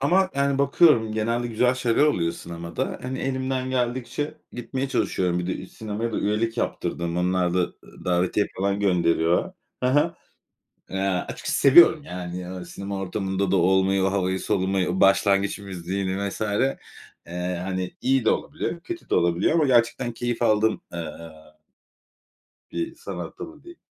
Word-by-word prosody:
ama, 185 +7 +3
yani, 140 0 +1
bakıyorum, 140 -5 +4
genelde 115 +3 0
güzel 125 +2 +2
şeyler 125 0 +1
oluyor 85 - +1
sinemada. 85 -1 -5
Hani, 130 +1 -4
elimden 130 0 -2
geldikçe 130 +4 -2 0.2
gitmeye 130 +3 -3
çalışıyorum. 90 -9 0
Bir 90 - -3
de 95 - -1
ü - - -8
sinemaya 110 +3 -4
da - - -1
üyelik 115 +3 0
yaptırdım. 85 -6 -2
Onlar 90 0 +1
da, - - +2
ııı, 90 - -5
davetiye 90 +3 +1
falan 100 +1 0
gönderiyor. 85 -3 +2 0.3
Ha 125 +1 +1
ha. 145 - +3 0.8
Eee, 95 - -3 0.3
açıkçası - - -2
seviyorum, 150 +2 +7
yani, 90 -4 -6
ııı, 90 -1 -7
sinema 100 +2 -5
ortamında 95 0 -2
da 95 - +3
olmayı, 95 +2 +3
o 95 - +1
havayı 95 -1 0
solumayı, 95 -2 0
o 95 - -1
başlangıç 100 0 +3
müziğini 95 +1 -3
vs. - - -8
Eee, 90 -5 -3
hani, 95 -1 -3
iyi 130 -1 +2
de - - +4
olabiliyor, 155 +3 -2
kötü 345 - -8
de - - +2
olabiliyor 85 - +2
ama 165 -2 +4
gerçekten 120 -1 +2
keyif 120 +1 -3
aldığım, 110 -1 +3
eee, 85 -2 -4 1.6
bir 335 0 -3
sanat - - -7
dalı 335 -4 -9
diyeyim. 345 0 -13
100 Hz, 155 wpm, -24 LUFS, 90-130 Hz, 1.6 s, seviyorum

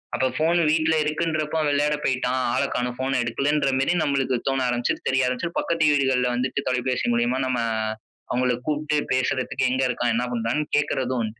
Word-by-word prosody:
அப்போ 130 - +1
ஃபோன் 165 +3 +2
வீட்ல 160 0 +2
இருக்குன்றப்போ 155 0 -1
விளையாட 145 +1 +2
போயிட்டா. 125 -1 0 0.2
ஆள - - +1
கானோ. 125 0 -1
ஃபோன 130 0 -1
எடுக்கலன்ற 140 +4 0
மேரி 135 +6 +2
நம்மளுக்கு 135 -3 0
தோண 135 0 +1
ஆரம்பிச்சு, 120 0 0
தெரிய 130 0 +2
ஆரம்பிச்சு, 125 +7 -2
பக்கத்து 165 -1 0
வீட்டுகள்ல 130 -3 +2
வந்துட்டு 130 +3 -2
தொலைபேசி 125 0 -1
மூலியமா 120 +2 +1
நம்ம 125 -2 0 0.7
அவங்கள 125 0 +1
கூப்பிட்டு 150 0 0 0.2
பேசுறதுக்கு 130 0 0
"எங்க 130 +1 +1
இருக்கா? 120 -1 -1
என்ன 125 - 0
பண்ணுறான்னு" 120 +6 -1
கேட்கறது 130 -3 0
உண்டு. 110 +1 -6
130 Hz, 165 wpm, -24 LUFS, 125-150 Hz, 0.7 s, ஃபோன்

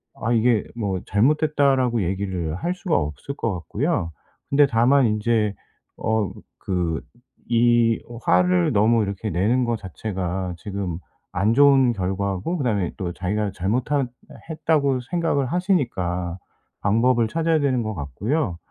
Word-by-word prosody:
아 115 - -1
이게 115 -1 +3
뭐 100 -5 -2
잘못됐다라고 135 0 +2
얘기를 90 -3 -2
할 175 - -2
수가 185 -3 0
없을 75 - -4
것 115 -6 -1
같고요. 95 - -2 0.4
근데 145 +1 +5
다만 125 +3 +4
인제 105 -1 +1 0.4
어 110 -3 0 0.3
그 90 -4 -1 0.5
이 115 -1 +4 0.2
화를 90 0 +3
너무 110 +2 +3
이렇게 100 +2 -3
내는 110 +8 +1
거 120 0 0
자체가 95 -2 -4
지금 95 -3 -4 0.3
안 100 +5 +2
좋은 135 -1 +5
결과고 95 - -2
그다음에 105 - 0
또 90 -4 -3
자기가 100 +3 -2
잘못한 125 +9 0 0.4
했다고 150 -5 +1
생각을 165 -6 0
하시니까 110 - -1 0.4
방법을 115 +3 +3
찾아야 165 +5 +1
되는 130 -4 +1
것 110 0 -3
같고요. 90 - -2
110 Hz, 275 characters per minute, -23 LUFS, 95-135 Hz, 0.5 s, 근데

